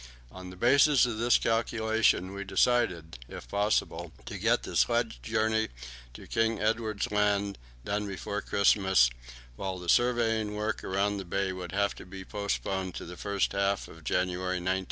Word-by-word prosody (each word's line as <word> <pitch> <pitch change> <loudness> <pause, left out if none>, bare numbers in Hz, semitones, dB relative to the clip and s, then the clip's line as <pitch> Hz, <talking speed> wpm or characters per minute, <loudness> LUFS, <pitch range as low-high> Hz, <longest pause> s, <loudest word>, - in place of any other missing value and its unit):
On 95 0 -9
the 90 - -10
basis 135 +6 +5
of 115 -3 -3
this 120 +1 +4
calculation 110 -4 +1
we 100 0 -5
decided, 95 - +1
if - - -9
possible, 100 -4 0
to - - -6
get - - +2
the - - -6
sledge - - +1
journey 110 - 0 0.5
to - - -10
King 115 0 0
Edward 110 -1 0
Land 100 -1 +1 0.3
done 105 0 -1
before 100 +1 -4
Christmas, 95 - +3 0.5
while 95 -1 -3
the 90 -1 -7
surveying 115 -3 +2
work 105 0 -2
around 100 +2 0
the 95 - -4
bay 95 +1 -1
would 90 -1 -7
have 100 +1 +1
to - - -10
be 95 0 -9
postponed 95 0 -3
to - - -6
the 90 - -8
first 100 0 -1
half 100 0 0
of 80 - -14
January, 90 +2 -1
1912. 95 +1 0
100 Hz, 165 wpm, -29 LUFS, 95-110 Hz, 0.5 s, basis